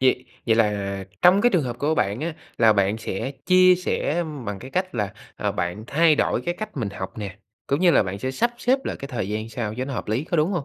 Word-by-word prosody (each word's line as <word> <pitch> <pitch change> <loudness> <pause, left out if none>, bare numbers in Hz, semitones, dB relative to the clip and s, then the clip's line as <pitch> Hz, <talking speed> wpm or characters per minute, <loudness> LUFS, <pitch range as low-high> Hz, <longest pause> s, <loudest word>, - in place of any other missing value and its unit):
Vậy 130 -1 +3 0.2
vậy 115 - +4
là 100 -3 0 0.2
trong 180 +3 +7
cái 245 - +4
trường 180 -8 +2
hợp 120 -1 -4
của 150 +4 +1
bạn 105 -2 0
á, 165 0 -3 0.2
là 115 -2 +6
bạn 100 +1 +1
sẽ 115 +4 -3 0.2
chia 185 0 +7
sẻ 175 -2 -1 0.2
bằng 100 -1 -3
cái 130 +5 -10
cách 185 +2 -1
là, 105 -4 -1 0.2
ờ, - - -1
bạn 90 +5 -3
thay 160 +1 +4
đổi - - +1
cái 175 0 -2
cách 215 -4 -7
mình 110 -6 -2
học 95 +2 -7
nè, 100 -1 -6 0.3
cũng 140 +4 0
như 180 -2 +6
là - - +5
bạn 95 +1 -4
sẽ 130 +5 -2
sắp 235 - +1
xếp 260 +2 +2
lại - - -3
cái 140 - -7
thời 110 -7 -3
gian 110 +1 -3
sao 110 -2 -4
cho 130 +2 -3
nó 135 - -5
hợp - - -5
lý, 120 +8 0
có 170 - -1
đúng 155 +4 +2
hông? 170 -7 -1
125 Hz, 265 wpm, -24 LUFS, 105-170 Hz, 0.3 s, trong